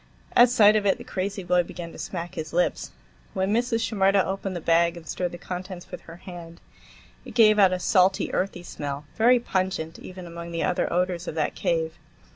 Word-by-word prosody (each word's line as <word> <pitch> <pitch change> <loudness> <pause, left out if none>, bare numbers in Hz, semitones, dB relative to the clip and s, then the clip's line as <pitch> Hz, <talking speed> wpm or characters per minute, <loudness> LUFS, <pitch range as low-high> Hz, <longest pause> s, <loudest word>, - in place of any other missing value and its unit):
At 240 0 +7
sight 215 -3 +6
of 205 -1 +2
it, 195 - +3
the - - -9
crazy 195 +1 -4
boy 180 0 +3
began 170 -1 -8
to - - -12
smack 175 -1 -5
his 155 -1 -6
lips. 175 +1 0 0.5
When 190 +2 0
Mrs. 235 0 +1
Shimerda 195 -3 +2
opened 195 0 -3
the - - -2
bag 170 +1 +2
and 165 - -12
stirred 180 -1 -2
the 175 - -7
contents 180 0 -7
with - - -7
her 165 - -9
hand, 170 -2 -10 0.6
it - - -11
gave 215 -2 +6
out 190 -2 +6
a 185 - 0
salty, 185 +1 +2
earthy 180 -2 -2
smell, 145 -3 -6
very 245 +3 +5
pungent, 185 -7 -2
even 185 -1 -9
among 170 0 -8
the 165 - -1
other 180 - 0
odors 180 0 -1
of - - -4
that 155 -2 0
cave. 165 0 -1
180 Hz, 205 wpm, -25 LUFS, 170-195 Hz, 0.6 s, At